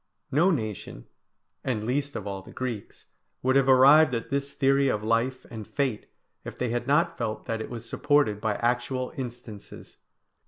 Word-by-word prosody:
No 160 +7 +4
nation, 110 - -3 0.6
and 120 -5 -2
least 140 +5 -2
of 105 - -5
all 100 -1 -4
the - - -14
Greeks, 120 -5 -6 0.4
would 130 +1 +2
have 135 -1 +4
arrived 135 +2 +7
at 115 - -5
this 140 0 -1
theory 135 0 +2
of 105 -5 0
life 115 +4 0
and 110 -3 -7
fate, 130 -7 -2 0.4
if - - -8
they 125 - -1
had 120 +1 -2
not 150 +4 +2
felt 110 -2 -3
that 115 -2 -3
it - - -6
was 115 -1 -7
supported 145 -7 +1
by 110 -2 0
actual 125 +2 -1
instances. 120 -5 -9
125 Hz, 170 wpm, -27 LUFS, 110-135 Hz, 0.6 s, arrived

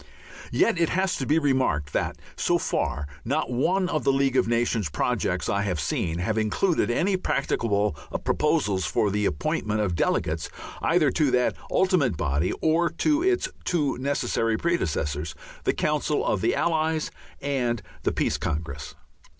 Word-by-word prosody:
Yet 225 -7 +2
it 170 - +3
has 190 -1 +1
to 135 - -3
be 155 - +3
remarked 130 - +1
that, - - -1 0.2
so - - +2
far, 75 - -1 0.2
not 140 +3 -1
one 180 +10 +1
of 155 -4 -1
the - - +4
League 135 -1 +1
of - - +3
Nations 115 -5 +1
projects - - -1
I 100 - +1
have 90 -5 -1
seen 80 +3 -1
have 105 +5 0
included 110 - +1
any 185 +11 +2
practicable 105 - 0 0.3
proposals 120 - +1
for 105 - +1
the 105 0 +1
appointment 105 +8 -1
of 100 -4 0
delegates 80 -1 0 0.3
either - - +3
to 150 -3 +2
that 125 -1 +2
ultimate 160 - +2
body 75 +5 0
or 165 +2 +3
to 300 - +1
its 375 +1 +2 0.2
two 155 -6 0
necessary 125 -4 0
predecessors, 80 - -1 0.3
the - - +3
Council - - 0
of - - +1
the - - +2
Allies 160 -1 0 0.3
and 125 -6 -1 0.2
the - - +1
Peace - - 0
Congress. 75 -3 -4
125 Hz, 155 wpm, -26 LUFS, 95-160 Hz, 0.3 s, the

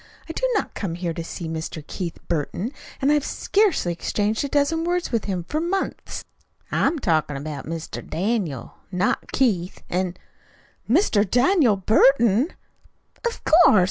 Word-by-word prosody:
I 325 - -5
do - - 0
not 415 - -1
come 180 -6 -3
here 175 -1 -2
to 165 - -5
see 165 0 -6
Mr. 160 -1 -5
Keith 170 0 -5
Burton, 175 - -2 0.3
and 280 - +4
I've 295 -1 +3
scarcely 390 - +1
exchanged 210 +6 -1
a - - -1
dozen 290 +4 +1
words 355 +1 -1
with 230 -3 0
him 185 -4 -2
for 300 - -2
months." 380 +3 -3 0.5
"I'm 335 - +2
talkin' 155 - +1
about 145 -1 -6
Mr. 165 0 -5
Daniel, 180 - -2
not 185 +1 0
Keith, 195 -9 0
an' 180 0 0 0.4
" - - -32
"Mr. 240 - +4
DANIEL 250 - +4
Burton!" 230 - +4 0.8
"Of 470 - -5
course! 310 - +7
210 Hz, 150 wpm, -23 LUFS, -, 0.8 s, course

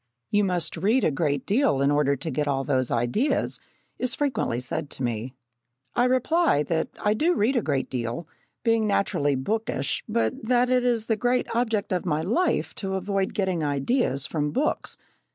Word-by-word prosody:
"You 205 0 +3
must 180 -3 -1
read 215 +10 +2
a - - +3
great 145 -1 -1
deal 205 - +2
in 140 +1 +3
order 145 -1 +2
to 150 +4 -4
get 150 -1 -1
all 135 -1 0
those 130 -3 +1
ideas," 120 - 0 0.4
is 255 0 0
frequently 240 - -1
said 145 +4 -4
to 130 - -5
me. 120 +2 -3 0.6
I 245 - +3
reply 260 - +2
that 160 +2 -1 0.2
I 210 - +3
do 330 +10 +2
read 230 +7 +2
a 240 - +3
great 140 -7 -1
deal, 120 +5 -4 0.4
being 225 -2 +2
naturally 145 -8 +1
bookish, 205 +2 -2
but 110 - 0
that 245 +2 +2
it 250 -1 +3
is 235 -3 +1
the 225 - +1
great 245 +2 0
object 225 -4 0
of 180 - -1
my 155 -1 0
life 325 - 0
to 190 -1 -2
avoid 195 0 -1
getting 185 -5 0
ideas 145 - 0
from 150 -1 -1
books. 275 - -1
190 Hz, 180 wpm, -25 LUFS, 140-235 Hz, 0.6 s, You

